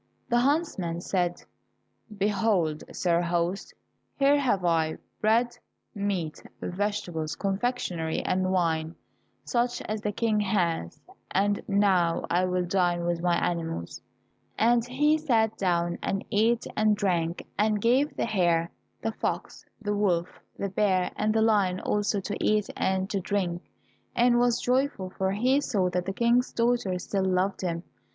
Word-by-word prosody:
The 240 -1 +3
huntsman 245 - 0
said, 175 -1 -1 0.7
"Behold, 195 -6 +1
sir 170 -1 +1
host, 175 +2 -1 0.5
here 280 +1 +4
have 205 -10 +1
I 160 -2 +1 0.2
bread, 230 +3 +2 0.4
meat, 195 -6 -2 0.2
vegetables, 175 -5 -3
confectionery 195 -6 -1
and 185 0 0
wine 165 -3 0 0.5
such 240 0 0
as 215 0 -3
the 210 - -1
King 215 0 +1
has, 175 - 0 0.3
and 205 +1 +1
now 190 -5 +2
I 180 +2 +3
will 180 0 0
dine 175 -1 +1
with 170 -1 -1
my 175 -1 +2
animals," 165 - -3 0.6
and 235 +1 +4
he 295 +6 +2
sat 225 -7 +2
down 175 -3 0
and 195 0 -2
ate 225 +3 +2
and 215 -1 +3
drank, 175 -4 -1
and 210 0 +2
gave 255 +7 +2
the - - 0
hare, 175 -6 +1 0.3
the 225 - 0
fox, - - -4
the 205 -2 -2
wolf, 185 -4 0 0.2
the 200 - -2
bear, 185 -2 +1
and 215 +1 +1
the 220 0 +2
lion 200 -5 +2
also 205 0 0
to 205 +2 -4
eat 215 -1 +1
and 190 0 0
to 200 - 0
drink, 180 -2 -1 0.5
and 240 0 +4
was 240 -1 +3
joyful, 250 -7 0
for 190 0 -1
he 255 +7 +2
saw 185 -9 0
that 180 0 -1
the - - 0
King's 235 +3 +2
daughter 235 -6 +1
still 190 +2 -2
loved 190 +1 0
him. 170 -2 -2
195 Hz, 145 wpm, -27 LUFS, 175-220 Hz, 0.7 s, here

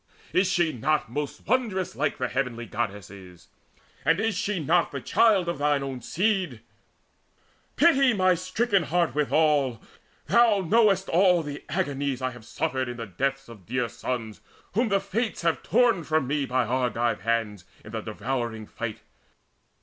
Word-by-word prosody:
is 185 +1 +3
she 175 -4 +1
not 145 0 0
Most 145 +2 -4
wondrous 215 -6 0
like 145 +1 -1
the 125 - -1
heavenly 120 -2 -2
Goddesses? 100 -6 -6 0.5
And 165 +2 +3
is 225 0 +1
she 200 0 -1
not 165 +3 +2
the 140 - -4
child 195 - +3
of 170 -4 -2
thine 145 -1 +1
own 135 -2 -5
seed? 185 - -1 1.1
Pity 275 -6 +5
my 185 -4 +3
stricken 190 +4 0
heart 170 -5 0
withal! 150 -4 +2 0.5
Thou 230 -4 +4
know'st 195 0 +3
All 175 -2 +3 0.2
agonies 140 -2 -1
I 130 -1 -2
have 120 -3 -13
suffered 130 +2 -2
in 120 - -6
the 115 - -5
deaths 135 +8 -2
Of 105 -7 -14
dear 125 0 -1
sons 115 -6 -5 0.3
whom 230 +4 +1
the 200 -1 +3
Fates 200 +2 -3
have 165 -1 +1
torn 230 -6 +2
from 155 -2 +1
me 140 +1 -1
By 125 -1 +1
Argive 120 -3 0
hands 110 -4 -1 0.2
in 105 - -10
the 110 0 -3
devouring 115 0 -4
fight. 110 0 -6
145 Hz, 155 wpm, -26 LUFS, 120-185 Hz, 1.1 s, Pity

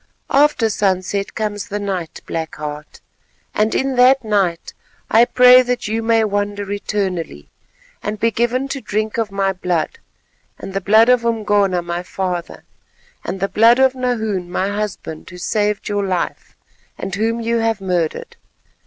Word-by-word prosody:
After 280 -5 +4
sunset 195 -1 -1
comes 210 -1 -3
the 205 -2 -3
night, 190 -5 -4
Black 160 -1 -4
Heart, 150 0 -7 0.5
and 215 +1 +1
in 265 -1 0
that 255 +1 +5
night 195 -6 0 0.4
I 230 +2 +6
pray 250 +1 +7
that 250 -2 -2
you 220 +2 -1
may 225 0 +3
wander 205 -1 -2
eternally, 185 - -3 0.5
and 210 0 -4
be 230 +2 +2
given 240 +4 0
to 275 -1 -4
drink 215 +1 -2
of 220 -3 -1
my 195 -1 0
blood 180 -4 -2 0.6
and 195 - -8
the 195 - -1
blood 220 +4 +5
of 250 -2 +4
Umgona 205 -5 +1
my 170 0 -3
father, 180 -1 -4 0.6
and 190 +2 -4
the 195 - 0
blood 230 +4 +5
of 265 0 +4
Nahoon 220 -8 -2
my 185 +2 -1
husband, 205 -6 -5
who 180 - -11
saved 210 +3 -1
your 205 -1 -1
life, 185 -3 -3 0.4
and 195 - -5
whom 225 +3 0
you 230 0 0
have 225 -2 0
murdered. 180 -4 -2
205 Hz, 155 wpm, -19 LUFS, 185-230 Hz, 0.6 s, pray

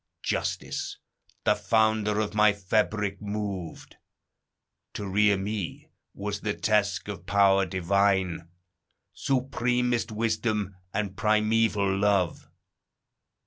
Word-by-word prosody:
Justice - - -3 0.5
the - - +4
founder 105 0 +2
of 110 -1 -1
my 105 -1 +5
fabric 100 0 -1
moved: 100 -5 -5 1.0
To 100 - -4
rear 100 +1 +3
me 100 -3 -5 0.2
was 100 0 -4
the 105 -2 -2
task 105 -1 +1
of 105 -2 -7
power 100 -1 +4
divine, 95 -1 +1 0.6
Supremest 125 -3 0
wisdom, 110 -2 -1 0.2
and 100 -1 -2
primeval 105 -2 +2
love. 100 -4 +1
105 Hz, 95 wpm, -27 LUFS, 100-110 Hz, 1.0 s, my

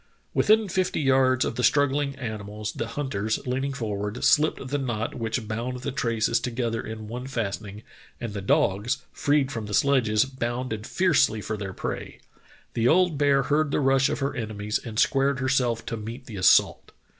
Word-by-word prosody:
"Within 215 0 +4
fifty 185 0 0
yards 130 -2 +3
of - - -3
the - - 0
strugghng 145 0 +2
animals 105 -3 -5
the 115 - -4
hunters, 115 -5 -2
leaning 130 +2 -1
forward, 105 -5 -3
shpped 150 -1 +2
the 145 +1 -1
knot 120 -4 -2
which 115 -1 -3
bound 120 +3 -4
the 140 - -3
traces 115 -2 0
together 115 -2 -2
in 110 -1 -7
one 125 +4 -6
fastening, 105 -4 -4 0.4
and 115 -4 -5
the 100 - -4
dogs, 100 +3 +1
freed 145 -3 +1
from 115 -5 -5
the 105 - -1
sledges, 130 -6 +3
bounded 120 -3 -4
fiercely 155 -11 +2
for 110 +1 -4
their 100 -2 -5
prey. - - -5 0.5
The 115 0 +1
old 170 -1 +3
bear 140 -1 +3
heard 150 +3 +1
the - - 0
rush 135 -1 +3
of - - -3
her 135 +1 -1
enemies 105 -3 -2
and 110 -2 -7
squared 135 +2 +2
herself 130 -3 0
to 115 - -4
meet 115 +4 -7
the 110 -6 -8
assault. 90 - +3
125 Hz, 175 wpm, -25 LUFS, 110-135 Hz, 0.5 s, Within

